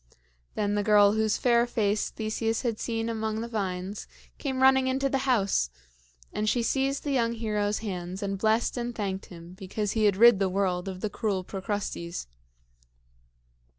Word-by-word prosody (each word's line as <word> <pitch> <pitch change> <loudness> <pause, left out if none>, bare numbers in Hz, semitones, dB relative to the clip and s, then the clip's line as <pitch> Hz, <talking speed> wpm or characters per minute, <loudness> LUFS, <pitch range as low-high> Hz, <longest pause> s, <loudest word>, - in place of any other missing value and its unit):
Then 205 -1 0
the 205 - +1
girl 205 -1 +5
whose 220 0 +1
fair 240 -1 +3
face 210 -3 0
Theseus 225 +1 -2
had 230 -3 -1
seen 225 -1 -2
among 220 -1 -2
the 230 - -4
vines, 195 -3 -4 0.3
came 265 -2 -1
running 265 0 +5
into 270 +1 +1
the 270 0 -1
house; 200 - +2 0.6
and 215 0 0
she 240 +1 +1
seized 270 +3 0
the 290 - -2
young 235 -3 +1
hero's 210 -2 -1
hands 185 -1 -4
and 195 -1 -2
blessed 220 +4 +1
and 240 0 -3
thanked 195 -3 -3
him 170 0 -11
because 195 +2 -3
he 220 -2 +1
had 200 -2 +3
rid 235 -2 +7
the 195 -1 +2
world 185 -1 0
of 185 -1 -6
the 215 - -1
cruel 200 -4 -1
Procrustes. 190 -3 -4
215 Hz, 170 wpm, -27 LUFS, 195-235 Hz, 0.6 s, rid